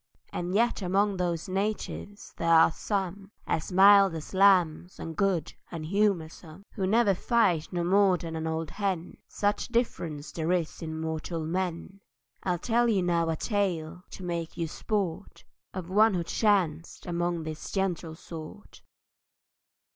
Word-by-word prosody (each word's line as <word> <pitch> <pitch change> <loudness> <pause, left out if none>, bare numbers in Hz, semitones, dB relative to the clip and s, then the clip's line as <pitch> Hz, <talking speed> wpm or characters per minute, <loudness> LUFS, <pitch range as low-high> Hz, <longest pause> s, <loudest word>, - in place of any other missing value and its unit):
And 175 +2 -3
yet 235 0 +2
among 195 +2 +1
those 175 -2 -1
natives 205 +1 -4
there 165 - -1
are 165 0 +7
some 195 +1 -3 0.2
As 160 - -2
mild 195 -1 +7
as 160 +3 -7
lambs, 185 -3 +3
and 165 -1 -6
good 190 -5 0 0.2
and 160 -2 -6
humoursome; 180 -2 -1
Who 190 -3 -1
never 215 0 +4
fight 185 -6 +1
no 175 -2 -1
more 190 +1 +4
than 165 -1 -6
an 160 0 -3
old 160 -1 -3
hen, 195 -4 -3
Such 205 0 -1
difference 170 -11 -2
there 160 +1 -2
is 170 -3 -2
in 160 -1 -5
mortal 160 0 -3
men. 180 +2 -3 0.4
I'll 180 -2 0
tell 235 +6 +2
you 195 -5 +2
now 170 -2 +1
a 160 - 0
tale, 180 -4 -2
to 190 - -9
make 170 -2 -4
you 165 -1 -1
sport, 200 +1 -3 0.3
Of 185 -2 -6
one 215 +1 +5
who 175 - 0
chanced 170 -5 0
among 175 -1 -1
this 155 -1 -6
gentle 180 -4 -2
sort." 165 +5 -10
180 Hz, 150 wpm, -28 LUFS, 165-200 Hz, 0.4 s, are